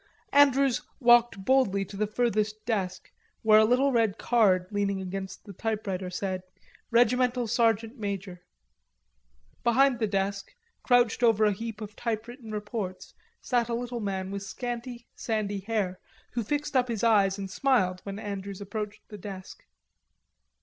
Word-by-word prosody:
Andrews 275 -3 +5 0.2
walked 240 -6 +4
boldly 210 -7 +3
to 195 - -11
the 210 +2 0
furthest 215 -1 -1
desk, 195 -6 -2 0.3
where 215 -1 +7
a 220 - +6
little 255 +5 +3
red 225 -5 +2
card 195 -7 +3
leaning 200 -1 0
against 190 0 -6
the 200 - -9
typewriter 195 -3 -3
said 185 0 -3 0.5
"Regimental 245 +1 +3
Sergeant 225 +1 +1
Major." 195 -3 -4 1.2
Behind 250 +1 +4
the 220 - +1
desk, 200 - -2 0.3
crouched 245 -2 +3
over 225 -3 +4
a 210 - +4
heap 225 +1 -6
of 210 -1 -7
typewritten 230 +1 -4
reports, 210 -3 -5 0.3
sat 240 -2 0
a 235 - 0
little 240 0 -4
man 190 -2 -3
with 200 0 -4
scanty 240 +3 -5
sandy 210 -3 -2
hair, 195 -3 -2 0.3
who 240 - -1
screwed 290 +5 -2
up 250 -1 +3
his 230 -3 -3
eyes 200 -4 +4
and 195 -1 -6
smiled 195 -8 +2
when 200 0 -6
Andrews 200 -2 -5
approached 210 +1 -6
the 210 -2 -9
desk. 190 -1 -9
215 Hz, 145 wpm, -28 LUFS, 195-240 Hz, 1.2 s, where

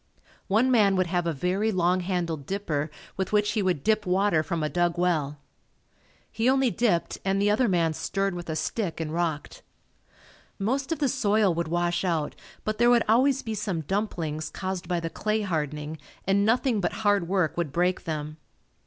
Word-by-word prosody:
One 225 +6 +3
man 205 -5 +4
would 185 -1 +2
have 175 0 -1
a - - +1
very 185 +8 0
long 180 -1 +2
handled 170 -6 -2
dipper 165 -7 -2 0.3
with 190 - -2
which 210 0 +2
he 210 - 0
would 180 -7 0
dip 215 -1 +2
water 185 -2 +3
from 160 +1 -2
a - - +1
dug 175 +1 0
well. 155 -5 0 0.9
He 230 +3 +1
only 265 -2 +3
dipped 210 -8 0
and 195 0 +1
the 205 +1 +3
other 240 +4 +3
man 170 -5 +2
stirred 195 +4 -1
with 175 -1 -7
a 160 - -1
stick 175 -1 -2
and 160 -1 -3
rocked. 165 -4 -2 1.0
Most 265 +9 -1
of 325 - 0
the 285 - +1
soil 215 -7 +2
would 170 0 -2
wash 175 +2 0
out 165 -5 -1 0.3
but 215 0 -2
there 240 0 +5
would 240 -1 +5
always 265 +5 +3
be 225 - -3
some 200 -5 -2
"dumplings" 160 -4 -2
caused 185 -2 -4
by 175 -1 0
the 165 -1 -4
clay 215 +1 -1
hardening 150 -4 -3 0.3
and 195 +1 +3
nothing 235 -1 +2
but 180 - -1
hard 205 -4 +3
work 175 -4 +1
would 170 -5 -2
break 180 +4 0
them. 155 -2 -4
185 Hz, 190 wpm, -26 LUFS, 165-210 Hz, 1.0 s, there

